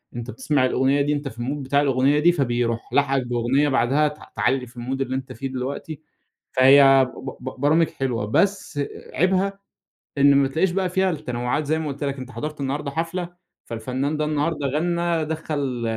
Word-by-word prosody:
أنت 120 Hz, +1 st, -5 dB
بتسمَع 150 Hz, -, +1 dB
الأغنية 130 Hz, +2 st, +2 dB
دي 145 Hz, +1 st, +1 dB
أنت 145 Hz, -1 st, -3 dB
في 120 Hz, -3 st, -9 dB
الMood 135 Hz, +4 st, -3 dB
بتاع 140 Hz, +2 st, +2 dB
الأغنية 140 Hz, +1 st, +2 dB
دي، 170 Hz, +3 st, +5 dB
فبيروح 120 Hz, -7 st, -1 dB
لاحقك 135 Hz, -3 st, +2 dB
بأغنية 125 Hz, +4 st, +1 dB
بعدها 135 Hz, +3 st, +2 dB
ت 150 Hz, 0 st, -6 dB, 0.2 s
تعلّي 130 Hz, 0 st, 0 dB
في 120 Hz, -, -18 dB
الMood 130 Hz, +3 st, -3 dB
اللي 130 Hz, -1 st, -2 dB
أنت 130 Hz, 0 st, -5 dB
فيه 135 Hz, +5 st, -5 dB
دلوقتي. 135 Hz, +4 st, -5 dB, 0.5 s
فهي 135 Hz, 0 st, +7 dB
ب 130 Hz, -, -6 dB
ب 130 Hz, -1 st, -7 dB
برامج 155 Hz, +3 st, +3 dB
حلوة، 125 Hz, -5 st, -2 dB
بس 190 Hz, -, 0 dB, 0.3 s
عيبها 190 Hz, +3 st, +1 dB, 0.6 s
إن 140 Hz, 0 st, +6 dB
ما 140 Hz, -1 st, +4 dB
تلاقيش 160 Hz, +7 st, +1 dB
بقى 185 Hz, 0 st, 0 dB
فيها 190 Hz, +1 st, +1 dB
التنوعات 125 Hz, -2 st, -2 dB
زي 155 Hz, +2 st, 0 dB
ما 160 Hz, -, -3 dB
قُلت 140 Hz, +1 st, -5 dB
لك. 140 Hz, -1 st, -2 dB
أنت 130 Hz, 0 st, -8 dB
حضرت 150 Hz, 0 st, -6 dB
النهاردة 140 Hz, +1 st, -2 dB
حفلة 170 Hz, +3 st, -3 dB, 0.4 s
فالفنان 130 Hz, +6 st, -3 dB
ده 155 Hz, -, 0 dB
النهاردة 150 Hz, -1 st, -1 dB
غنّى، 170 Hz, +2 st, 0 dB
دخّل 145 Hz, -5 st, -3 dB
140 Hz, 180 wpm, -23 LUFS, 130-155 Hz, 0.6 s, فهي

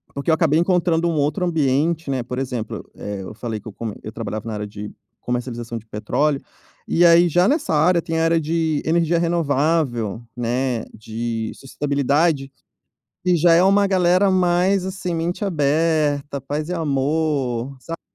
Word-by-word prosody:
porque 140 Hz, +3 st, -3 dB
eu -, -, +5 dB
acabei 160 Hz, -1 st, +3 dB
encontrando 170 Hz, -1 st, +2 dB
um -, -, 0 dB
outro 150 Hz, +4 st, 0 dB
ambiente, 160 Hz, 0 st, +1 dB
né, 130 Hz, -3 st, -1 dB
por 125 Hz, +1 st, -5 dB
exemplo, 125 Hz, -4 st, -4 dB
eh, 100 Hz, -1 st, -5 dB
eu 95 Hz, -, -8 dB
falei 110 Hz, 0 st, -5 dB
que 110 Hz, -, -13 dB
eu 110 Hz, -, -8 dB
como 110 Hz, -1 st, -5 dB
eu -, -, -7 dB
trabalhava 110 Hz, -1 st, -5 dB
na 110 Hz, -, -3 dB
área 105 Hz, 0 st, -4 dB
de 105 Hz, 0 st, -7 dB, 0.3 s
comercialização 120 Hz, -1 st, -4 dB
de 110 Hz, -, -10 dB
petróleo, 135 Hz, +7 st, -1 dB, 0.5 s
e 175 Hz, -, +3 dB
aí 170 Hz, +1 st, +7 dB
já 175 Hz, +2 st, +3 dB
nessa 285 Hz, -, +1 dB
área 170 Hz, +3 st, +3 dB
tem 165 Hz, 0 st, -2 dB
a -, -, +2 dB
área 165 Hz, 0 st, +3 dB
de 160 Hz, -1 st, 0 dB
energia 170 Hz, +1 st, +2 dB
renovável, 145 Hz, -, 0 dB
né, 120 Hz, 0 st, -1 dB
de 110 Hz, +1 st, -4 dB
sustentabilidade, 140 Hz, +1 st, 0 dB, 0.8 s
e 180 Hz, -1 st, +3 dB
já 170 Hz, +1 st, +4 dB
é 170 Hz, -, +5 dB
uma 200 Hz, +2 st, +4 dB
galera 185 Hz, 0 st, +3 dB
mais, 185 Hz, +1 st, +2 dB
assim, 185 Hz, -2 st, -3 dB
mente 170 Hz, +5 st, -2 dB
aberta, 150 Hz, -4 st, +1 dB
paz 145 Hz, +4 st, -4 dB
e -, -, -3 dB
amor, 140 Hz, -5 st, -1 dB
sabe. 165 Hz, +5 st, -7 dB
150 Hz, 170 wpm, -21 LUFS, 125-170 Hz, 0.8 s, aí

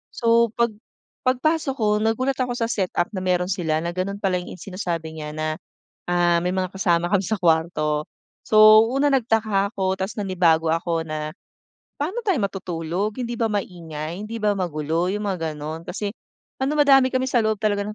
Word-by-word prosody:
So 230 Hz, -1 st, +3 dB
pag 235 Hz, -1 st, +2 dB, 0.6 s
pagpasok 280 Hz, +2 st, +1 dB
ko 210 Hz, -1 st, +2 dB
nagulat 250 Hz, +5 st, 0 dB
ako 250 Hz, -1 st, -1 dB
sa 230 Hz, -1 st, -1 dB
set-up 180 Hz, -3 st, -1 dB
na 200 Hz, -, -4 dB
meron 180 Hz, 0 st, +1 dB
sila, 165 Hz, -5 st, 0 dB
na 170 Hz, -, -2 dB
ganun 200 Hz, +2 st, -3 dB
pala 185 Hz, -2 st, +1 dB
'yung 180 Hz, -, -8 dB
sinasabi 170 Hz, -5 st, -4 dB
niya 150 Hz, 0 st, -5 dB
na, 155 Hz, 0 st, -2 dB, 0.5 s
ah, 175 Hz, -1 st, +3 dB
may 180 Hz, -, +1 dB
mga 185 Hz, -1 st, -1 dB
kasama 175 Hz, -3 st, +1 dB
kami 200 Hz, -2 st, +3 dB
sa 220 Hz, -, 0 dB
kwarto. 160 Hz, -3 st, +1 dB, 0.4 s
So 215 Hz, +1 st, +8 dB
una 275 Hz, +3 st, +1 dB
nagtaka 220 Hz, -5 st, +1 dB
ako 190 Hz, -1 st, 0 dB
tas 190 Hz, +2 st, -3 dB
nanibago 175 Hz, -5 st, +2 dB
ako 165 Hz, 0 st, 0 dB
na, 155 Hz, 0 st, -4 dB, 0.7 s
paano 370 Hz, +12 st, -2 dB
tayo 390 Hz, -5 st, +2 dB
matutulog 185 Hz, +1 st, -3 dB
hindi 240 Hz, 0 st, -3 dB
ba 225 Hz, -1 st, +1 dB
maingay? 170 Hz, -5 st, -4 dB
Hindi 230 Hz, +2 st, -5 dB
ba 205 Hz, -1 st, +3 dB
magulo? 165 Hz, 0 st, -1 dB
'Yung 210 Hz, 0 st, -3 dB
mga 165 Hz, -5 st, -2 dB
ganun. 155 Hz, +2 st, -6 dB
Kasi 205 Hz, +2 st, -3 dB, 0.5 s
ano 280 Hz, +3 st, +1 dB
madami 275 Hz, -3 st, +6 dB
kami 260 Hz, 0 st, +1 dB
sa 250 Hz, -, +3 dB
loob 215 Hz, -1 st, +1 dB
talaga 205 Hz, -1 st, +1 dB
ng 210 Hz, -, -5 dB
195 Hz, 175 wpm, -23 LUFS, 170-225 Hz, 0.7 s, So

